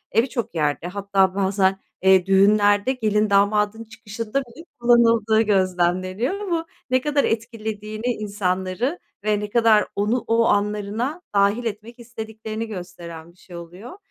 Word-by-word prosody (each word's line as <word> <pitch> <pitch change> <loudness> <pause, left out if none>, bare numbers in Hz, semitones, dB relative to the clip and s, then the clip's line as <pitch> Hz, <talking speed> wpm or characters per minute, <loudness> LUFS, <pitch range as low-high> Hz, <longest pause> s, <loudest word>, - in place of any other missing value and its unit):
eee, 225 - +5
bir - - -3
çok 235 -7 -4
yerde 150 +1 -1
hatta 195 0 +1
bazen, 195 -1 +1 0.2
eee, 190 -1 +5
düğünlerde 205 +3 +4
gelin, 215 -3 0
damadın 210 +2 +2
çıkışında 225 +2 -5
bile 260 +7 -14
kullanıldığı 230 -2 +4
gözlemleniyor 185 - 0
ama 345 -5 -2 0.2
ne 255 0 +2
kadar 295 0 +1
etkilediğini 220 -1 -4
insanları 205 - -2 0.2
ve 210 -1 +1
ne 210 0 -5
kadar 225 -1 +4
onu 215 +5 0
o 230 0 +3
anlarına 210 - -1
dâhil 200 +4 +2
etmek 225 +2 -6
istediklerini 220 -1 -6
gösteren 175 -4 -9
bir 175 - -29
şey 180 -1 -14
oluyor. 180 - -10
210 Hz, 135 wpm, -22 LUFS, 195-230 Hz, 0.2 s, eee